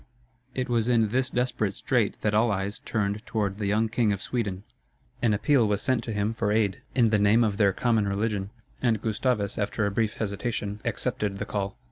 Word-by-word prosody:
It 130 Hz, 0 st, -1 dB
was 120 Hz, -2 st, +1 dB
in 115 Hz, -3 st, +3 dB
this 130 Hz, +4 st, +1 dB
desperate 125 Hz, -6 st, -1 dB
strait 120 Hz, -6 st, 0 dB
that 105 Hz, -, +1 dB
all 110 Hz, +3 st, +4 dB
eyes 100 Hz, 0 st, -2 dB
turned 105 Hz, -1 st, -2 dB
toward 105 Hz, -2 st, -1 dB
the 105 Hz, -, -1 dB
young 110 Hz, +3 st, +2 dB
King 115 Hz, -1 st, +1 dB
of 100 Hz, -, -1 dB
Sweden. 100 Hz, -3 st, -3 dB, 0.6 s
An 115 Hz, -, +3 dB
appeal 115 Hz, +3 st, +3 dB
was 105 Hz, 0 st, 0 dB
sent 130 Hz, -3 st, +1 dB
to 115 Hz, -, -4 dB
him 105 Hz, +1 st, 0 dB
for 110 Hz, -2 st, -1 dB
aid, 105 Hz, -3 st, +1 dB
in 115 Hz, -4 st, +4 dB
the 105 Hz, -, +3 dB
name 105 Hz, +3 st, +5 dB
of 105 Hz, -3 st, 0 dB
their 100 Hz, -2 st, +4 dB
common 110 Hz, 0 st, +1 dB
religion; 100 Hz, 0 st, -1 dB, 0.3 s
and 115 Hz, -4 st, +2 dB
Gustavus, 110 Hz, -1 st, -1 dB
after 105 Hz, +1 st, 0 dB
a 100 Hz, -, 0 dB
brief 110 Hz, +1 st, 0 dB
hesitation, 105 Hz, -1 st, -3 dB
accepted 100 Hz, -2 st, -2 dB
the 100 Hz, -, -3 dB
call. 100 Hz, -2 st, -3 dB
105 Hz, 200 wpm, -27 LUFS, 100-115 Hz, 0.6 s, name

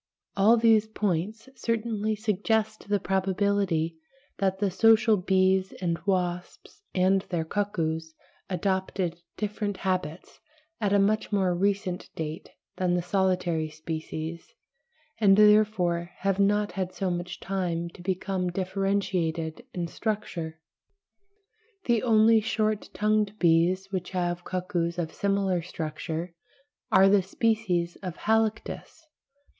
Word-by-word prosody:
All 215 Hz, +4 st, +5 dB
these 225 Hz, -2 st, +4 dB
points 215 Hz, +2 st, -2 dB
certainly 220 Hz, -2 st, -1 dB
suggest 215 Hz, 0 st, -1 dB
the 205 Hz, -1 st, +2 dB
probability 190 Hz, -3 st, 0 dB, 0.4 s
that 190 Hz, -1 st, +1 dB
the 200 Hz, -1 st, 0 dB
social 225 Hz, +2 st, +5 dB
bees 190 Hz, 0 st, +2 dB
and 170 Hz, -2 st, -2 dB
wasps 180 Hz, -, -2 dB
and 190 Hz, +1 st, +3 dB
their 170 Hz, -3 st, -1 dB
cuckoos 160 Hz, -5 st, -2 dB, 0.3 s
adopted 190 Hz, -2 st, -1 dB, 0.2 s
different 210 Hz, -1 st, -3 dB
habits 185 Hz, -3 st, -3 dB, 0.4 s
at 205 Hz, -3 st, 0 dB
a 205 Hz, -, +5 dB
much 210 Hz, +3 st, +1 dB
more 190 Hz, -3 st, +2 dB
recent 195 Hz, 0 st, -1 dB
date 160 Hz, 0 st, -5 dB, 0.3 s
than 180 Hz, -1 st, +1 dB
the 175 Hz, -, 0 dB
solitary 180 Hz, -4 st, 0 dB
species, 160 Hz, +1 st, -6 dB, 0.6 s
and 200 Hz, -3 st, +5 dB
therefore 210 Hz, -5 st, +4 dB
have 195 Hz, 0 st, 0 dB
not 205 Hz, +1 st, +2 dB
had 185 Hz, -2 st, -3 dB
so 190 Hz, -2 st, -1 dB
much 175 Hz, 0 st, -4 dB
time 175 Hz, -3 st, -2 dB
to 175 Hz, -, -14 dB
become 185 Hz, 0 st, -1 dB
differentiated 185 Hz, -4 st, -1 dB
in 175 Hz, -2 st, -3 dB
structure. 170 Hz, -6 st, -4 dB, 1.3 s
The 235 Hz, -3 st, +2 dB
only 225 Hz, -1 st, +5 dB
short 215 Hz, -1 st, -1 dB
tongued 210 Hz, -1 st, +1 dB
bees 180 Hz, +3 st, +2 dB
which 185 Hz, -2 st, -3 dB
have 175 Hz, -1 st, -2 dB
cuckoos 180 Hz, -2 st, -2 dB
of 165 Hz, -2 st, -3 dB
similar 195 Hz, -3 st, 0 dB
structure 165 Hz, 0 st, -5 dB, 0.6 s
are 195 Hz, -, +7 dB
the 200 Hz, 0 st, +5 dB
species 190 Hz, -4 st, 0 dB
of 180 Hz, -3 st, -6 dB
Halictus 220 Hz, 0 st, 0 dB
(pl. 315 Hz, -, -35 dB
190 Hz, 120 wpm, -27 LUFS, 175-210 Hz, 1.3 s, are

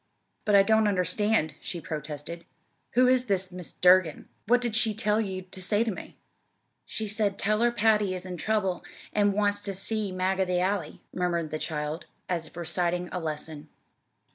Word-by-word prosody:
"But 210 Hz, -, +4 dB
I 200 Hz, -, +8 dB
don't 220 Hz, +1 st, +4 dB
understand," 190 Hz, -2 st, +1 dB
she 175 Hz, -, -4 dB
protested. 155 Hz, +1 st, -5 dB, 0.5 s
"Who 250 Hz, +1 st, +5 dB
is 255 Hz, 0 st, +3 dB
this 190 Hz, -4 st, 0 dB
Mrs. 180 Hz, -5 st, -9 dB
Durgin? 180 Hz, -3 st, +5 dB, 0.2 s
What 245 Hz, +2 st, +5 dB
did 240 Hz, -3 st, -2 dB
she 220 Hz, -2 st, +2 dB
tell 215 Hz, 0 st, +2 dB
you 190 Hz, -3 st, -4 dB
to 185 Hz, +1 st, -10 dB
say 205 Hz, +4 st, +2 dB
to 230 Hz, -, -1 dB
me?" -, -, -9 dB, 0.7 s
"She 220 Hz, -, -3 dB
said, 205 Hz, -1 st, 0 dB
'Tell 215 Hz, +2 st, +1 dB
her 240 Hz, 0 st, +4 dB
Patty 210 Hz, -4 st, +2 dB
is 180 Hz, 0 st, -7 dB
in 180 Hz, -1 st, -5 dB
trouble 195 Hz, -3 st, 0 dB, 0.3 s
an' 205 Hz, -1 st, +3 dB
wants 205 Hz, 0 st, +1 dB
ter 200 Hz, -, -3 dB
see 205 Hz, +1 st, -1 dB
Mag 185 Hz, +1 st, 0 dB
of 190 Hz, -, +2 dB
the 180 Hz, -1 st, +1 dB
Alley,'" 185 Hz, -4 st, -1 dB
murmured 170 Hz, -3 st, -1 dB
the 155 Hz, -, -2 dB
child, 150 Hz, +1 st, -3 dB, 0.2 s
as 170 Hz, -3 st, -2 dB
if -, -, -16 dB
reciting 175 Hz, +1 st, -1 dB
a 180 Hz, -, -2 dB
lesson. 155 Hz, -1 st, -5 dB
190 Hz, 185 wpm, -28 LUFS, 175-210 Hz, 0.7 s, I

